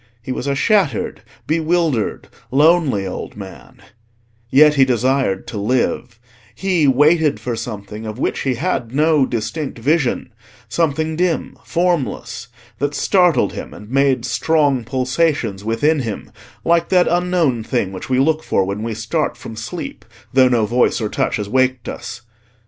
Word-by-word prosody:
He 130 - -5
was 130 +1 -3
a 140 - +1
shattered, 180 - +1 0.2
bewildered, 160 -6 0 0.2
lonely 145 - +3
old 95 - -6
man; 95 -2 -11 0.7
yet 150 +4 +6
he 135 -2 +5
desired 130 -4 +1
to 105 - -5
live: 120 +1 -1 0.4
he 175 0 +1
waited 150 +3 +3
for 120 -2 -3
something 105 0 -6
of 110 +1 -6
which - - -1
he 130 -2 0
had 130 -4 -2
no 150 -2 +3
distinct 130 +6 -3
vision—something 140 +2 -1
dim, 175 -2 0
formless—that 130 -6 -2
startled 180 -1 +3
him, - - -7
and 105 +2 -12
made 135 -2 +2
strong 140 0 +1
pulsations 130 -4 0
within 145 +8 +1
him, 115 -6 -5 0.3
like 170 0 +2
that 180 -1 +4
unknown 175 -8 +1
thing 110 -5 -1
which 95 +5 -8
we 130 - +2
look 155 +4 +2
for 95 - 0
when 100 +2 -4
we 115 0 -3
start - - -2
from - - -9
sleep, - - -6 0.3
though 130 -1 +5
no 120 -3 +2
voice 120 +2 +2
or 110 -2 -2
touch - - 0
has 105 -3 -3
waked 130 +2 +1
us. 120 0 -7
130 Hz, 145 wpm, -19 LUFS, 115-155 Hz, 0.7 s, yet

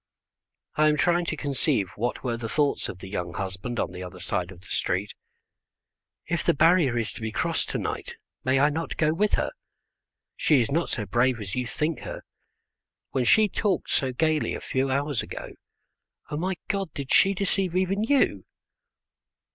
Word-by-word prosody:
I 155 0 +5
am 150 - +2
trying 175 +2 +3
to 160 - -2
conceive 135 - 0
what 120 +3 -2
were 120 -3 0
the 115 -1 -5
thoughts 145 +1 +1
of - - -6
the 95 - -9
young 90 -3 -4
husband 95 +5 -3
on - - -1
the 90 0 -7
other 90 0 -8
side 90 -1 -2
of 95 -2 -12
the - - -17
street. 95 +3 -1 1.1
"If 170 -1 -1
the - - +3
barrier 165 -6 +4
is 115 -2 -1
to - - -9
be 110 0 -2
crossed - - -1
to - - -1
night - - -4 0.3
may 130 +1 +3
I 145 +2 +4
not 165 +2 -3
go 155 -1 +3
with 210 +5 +1
her? - - +1 0.8
She 150 -4 +4
is 120 +2 0
not 165 +4 +1
so 105 - -2
brave 120 +5 +2
as 100 -3 -6
you 125 -1 -1
think 155 +4 -1
her. - - -7 0.9
When 130 -2 +1
she 215 - +6
talked 195 -3 -1
so 130 -1 +1
gaily 155 +3 +1
a - - -4
few 135 +1 -1
hours 140 0 0
ago, - - -7 0.8
O - - -1
my 185 +4 -1
God, 195 -5 -1
did 140 -2 -2
she 195 +1 +5
deceive 190 -2 0
even 190 +3 +1
you?" 275 +3 +2
140 Hz, 185 wpm, -26 LUFS, 110-170 Hz, 1.1 s, she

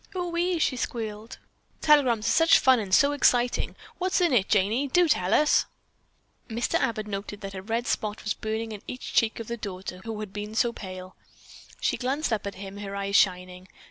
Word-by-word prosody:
"Ohee," 350 0 -1
she 280 -5 0
squealed, 225 0 -5 0.4
"telegrams 260 -8 +4
are - - +2
such 325 +1 +6
fun 260 -2 +4
and 200 -3 -5
so 280 +9 +5
exciting. 250 -4 +2 0.2
What's 370 +1 +1
in 345 -5 +2
it, 200 -6 +2
Janey, 215 +7 +2
do 350 +6 +3
tell 185 - +1
us!" 300 +6 +4 0.8
Mr. 235 +1 -2
Abbott 215 -2 -1
noted 205 0 -6
that 195 -1 -6
a 190 - -6
red 230 +4 -2
spot 210 -3 -2
was 210 - -1
burning 220 +1 -4
in 210 -2 -7
each 250 - -7
cheek 225 0 +2
of 230 - -5
the 235 - -4
daughter 185 -3 -7
who 225 -1 -5
had 210 -2 -7
been 210 +1 -6
so 235 +1 +2
pale. 185 -2 -9 0.6
She - - 0
glanced 270 +1 -1
up 210 -2 -2
at 200 - -6
him, 195 +1 -8
her 200 -1 -6
eyes 200 0 -2
shining. 180 -1 +1
220 Hz, 195 wpm, -26 LUFS, 200-255 Hz, 0.8 s, such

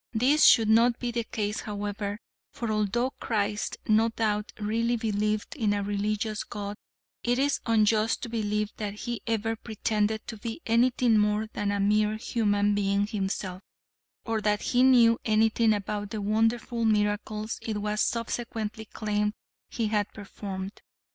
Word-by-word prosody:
This 265 +7 +4
should 225 -2 +7
not 230 +2 +4
be 245 -1 -3
the 235 0 -1
case 210 -1 -2
however, 205 0 -4 0.3
for 235 -2 -3
although 215 +4 0
Christ 210 -2 -1
no 220 +1 +4
doubt 215 -2 -1
really 230 +3 0
believed 215 0 -1
in 220 -8 +1
a 205 0 -1
religious 205 +1 -1
god, 205 0 -6 0.5
it 245 0 +1
is 280 +1 +1
unjust 220 0 +2
to - - -3
believe 210 -2 -1
that 205 -2 -4
he 240 +2 -4
ever 225 0 0
pretended 220 -1 -1
to 225 - -7
be 225 +6 -5
anything 235 -1 +3
more 210 +1 +2
than 205 -1 -1
a 200 - -1
mere 210 +1 +2
human 205 -3 +1
being 200 0 +1
himself, 195 -3 -3 0.6
or 225 -2 -1
that 210 0 +1
he 245 - +2
knew 240 -3 +6
anything 220 +1 +3
about 205 0 -2
the 215 - -4
wonderful 225 +3 0
miracles 215 0 0
it 220 -2 -3
was 210 +1 -1
subsequently 225 -2 -2
claimed 210 -1 -1 0.4
he 230 - -2
had 210 -1 0
performed. 195 -1 -7
215 Hz, 150 wpm, -27 LUFS, 205-230 Hz, 0.6 s, should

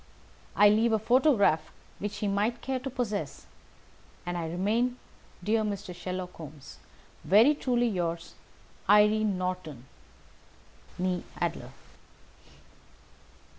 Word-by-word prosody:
I 210 - +7
leave 220 +2 +3
a - - +4
photograph 235 - +3 0.3
which 205 0 -4
he 210 - -2
might 210 +4 0
care 265 0 -1
to 270 - -5
possess; 235 -6 -4 0.8
and 175 0 -3
I 165 -2 -3
remain, 220 +8 0 0.5
dear 220 +3 +2
Mr. 200 -4 -4
Sherlock 180 0 -5
Holmes, 150 -3 -11 0.4
very 220 - +6
truly 245 -4 +1
yours, 170 -5 -3 0.6
"Irene 210 -1 +4
Norton, 180 -8 -4 1.1
née 180 -1 0 0.2
Adler." - - -2
205 Hz, 105 wpm, -28 LUFS, 180-230 Hz, 1.1 s, I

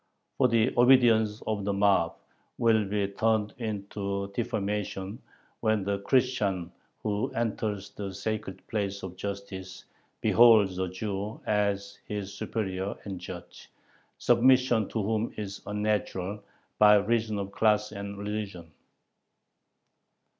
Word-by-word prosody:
"For 130 - +6
the 115 -2 +2
obedience 120 -4 +5
of 105 -2 -1
the 100 +1 0
mob 100 -4 +3 0.4
will 110 -2 +3
be 100 0 0
turned 110 +1 0
into 100 -2 -3
defamation 105 -1 -3 0.4
when 110 -3 +1
the 100 0 -1
Christian 100 -7 +1 0.3
who 105 0 0
enters 105 -3 -2
the 100 -2 -5
sacred 100 +1 -4
place 100 -2 -3
[of 95 -1 -6
justice] 95 -1 -6 0.3
beholds 110 -6 +5
a 95 - 0
Jew 100 +2 -4
as 100 -1 0
his 100 -2 -4
superior 95 -3 -3
and 95 -3 -6
judge, 90 0 -10 0.5
submission 120 -2 +4
to 110 - -2
whom 110 +2 -1
is 100 -2 -5
unnatural, 105 -1 -2 0.4
by 105 0 +8
reason 110 +1 +1
of 100 -1 -4
class 105 0 +2
and 100 0 -6
religion." 100 -5 -5
105 Hz, 120 wpm, -28 LUFS, 100-110 Hz, 0.5 s, by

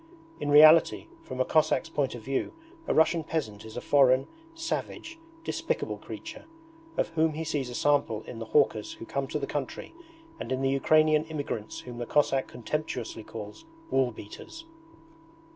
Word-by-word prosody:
In 145 - -2
reality, 155 +3 +7 0.2
from 130 - -8
a 130 - +3
Cossack's 155 +1 +2
point 145 -6 -1
of 115 - -9
view 135 +2 -2 0.3
a - - +2
Russian 160 +1 +4
peasant 110 -10 -3
is 110 +1 -9
a - - -3
foreign, 135 -2 +4 0.3
savage, 330 0 -4 0.2
despicable - - -2
creature, - - -9 0.5
of - - +1
whom 160 -1 +1
he 160 +2 -3
sees 145 -5 -2
a 120 - -6
sample 140 -7 +1
in 115 - -8
the 115 - -5
hawkers 110 -3 +2
who - - -10
come 140 +2 -2
to 150 - -2
the 140 - -2
country 140 - -5 0.5
and 120 - -6
in 130 +1 -1
the 135 - +2
Ukrainian 155 +2 +4
immigrants 145 -9 -5
whom 120 -1 -9
the 120 - -4
Cossack 135 -2 +2
contemptuously 125 -4 -4
calls 105 -1 -9 0.3
'woolbeaters'. 135 - -3
140 Hz, 160 wpm, -28 LUFS, 120-155 Hz, 0.5 s, reality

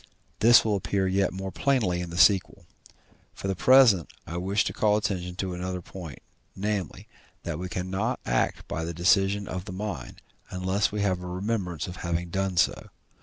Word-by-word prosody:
This 115 +2 +7
will 105 -2 +1
appear 95 0 -1
yet 95 +1 +1
more 95 +1 -5
plainly 110 -11 +1
in 90 - -5
the 85 - -6
sequel. 95 0 +3 0.7
For - - -5
the 95 - -1
present 115 - +5 0.2
I 85 +2 -5
wish 95 +4 +1
to - - -3
call 105 -1 +2
attention 90 -4 -3
to 95 0 -3
another 90 +1 -4
point, 85 -6 -9 0.3
namely, 100 -4 -3 0.4
that 85 -2 -4
we 90 0 -5
cannot 95 +7 -2
act - - 0
by 80 - -3
the 85 0 -4
decision 95 +3 +2
of 90 0 -5
the 105 - -7
mind, 100 +2 -6 0.3
unless 95 +2 0
we 105 0 -2
have 95 -3 0
a 90 - -7
remembrance 90 -2 -3
of 90 0 -8
having 85 0 -3
done 95 0 -1
so. - - +1
95 Hz, 180 wpm, -27 LUFS, 90-100 Hz, 0.7 s, This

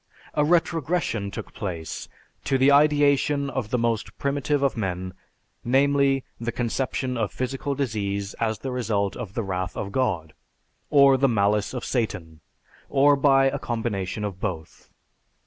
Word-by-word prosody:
A 150 - +2
retrogression 165 - +1
took - - -8
place 85 -6 -5 0.4
to 135 - +2
the 135 +2 +5
ideation 145 -1 +3
of 130 -5 -3
the 125 - +1
most 115 -2 -1
primitive 140 0 0
of 140 - +2
men, 95 -4 -3 0.5
namely, 135 +1 +3 0.2
the 120 0 -2
conception 125 +1 -2
of 110 -4 -1
physical 135 +2 -3
disease 100 -6 -2
as 110 -1 0
the 135 - -5
result 105 -5 -1
of 105 -5 -7
the 115 - -1
wrath 95 -2 -3
of 100 - -4
God, 95 -11 -1 0.6
or 140 -2 +6
the 135 +1 +3
malice 105 -2 +1
of 125 - -4
Satan, 85 - -3 0.5
or 140 +1 +5
by 135 -1 +4
a 135 - 0
combination 110 -4 -3
of 100 -3 -4
both. 85 -5 -5
120 Hz, 145 wpm, -25 LUFS, 100-140 Hz, 0.6 s, or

